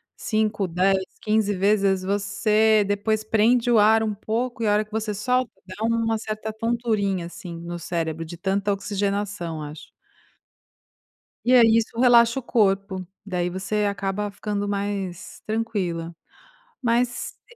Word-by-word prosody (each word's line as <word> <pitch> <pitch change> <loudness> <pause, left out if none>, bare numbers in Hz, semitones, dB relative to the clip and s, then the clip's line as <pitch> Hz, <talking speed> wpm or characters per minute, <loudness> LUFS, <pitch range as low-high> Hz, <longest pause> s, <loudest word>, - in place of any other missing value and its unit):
5, 215 -3 0
10, 190 +2 +2 0.2
15 215 -1 +1
vezes, 195 -1 +2
você 210 +2 +2
depois, 210 +2 0
prende 230 +3 +3
o 225 - +5
ar 220 +1 +5
um 215 - -1
pouco 230 +4 -3
e, 220 - +1
a 205 - +4
hora 210 +1 +2
que 215 - -29
você 220 0 -2
solta 250 +5 0 0.2
dá 195 +4 -7
uma 230 -1 +1
certa 215 0 -5
tonturinha, 220 -5 -1
assim, 170 -1 -8
no 175 0 -6
cérebro 165 -1 -3
de 165 +1 -9
tanta 195 +3 0
oxigenação, 200 -4 -2
acho. 150 +1 -9 1.6
E 250 - +4
aí, 230 -2 +6
isso 230 +1 -2
relaxa 235 0 +5
o - - -10
corpo. 195 -5 +1 0.2
Daí, 180 -3 -1
você 195 +3 -1
acaba 200 0 -2
ficando 205 0 -3
mais 200 -3 -4
tranquila. 190 -7 -2 0.7
Mas 245 - -2
205 Hz, 140 wpm, -24 LUFS, 190-220 Hz, 1.6 s, aí